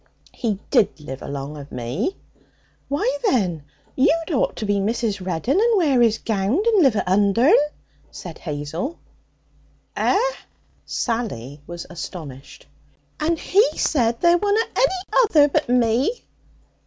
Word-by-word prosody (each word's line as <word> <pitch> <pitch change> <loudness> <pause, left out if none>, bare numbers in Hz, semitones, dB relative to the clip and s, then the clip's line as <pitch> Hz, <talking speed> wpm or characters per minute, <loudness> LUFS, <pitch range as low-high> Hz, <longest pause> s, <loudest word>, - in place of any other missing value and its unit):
'He 220 -6 -2
did 200 - +2
live 135 -3 -8
along 140 +1 -6
of 140 -1 -10
me.' 135 - -3 0.7
'Why, 285 0 -1
then, 180 - 0 0.3
you'd 325 +5 +2
ought 275 - 0
to 220 - -4
be 205 0 +1
Mrs. 210 -1 -1
Reddin, 185 - 0
and 460 0 +3
wear 290 -8 +3
this 230 -2 +4
gownd, 220 - 0
and 440 -5 +4
live 265 -8 +4
at 200 - -1
Undern,' 230 - +4 0.4
said 175 -3 -9
Hazel. 160 - -4 1.0
'Eh?' - - +2 0.7
Sally 150 - -3
was 175 0 -7
astonished. 155 -6 -9 0.5
'And 325 +2 +1
he 410 +8 +2
said 235 -5 +1
there 345 0 +5
wunna 415 +2 +2
any 405 -1 +2
other 295 -6 +5
but 300 -2 0
me.' 250 - +1
230 Hz, 130 wpm, -22 LUFS, -, 1.0 s, there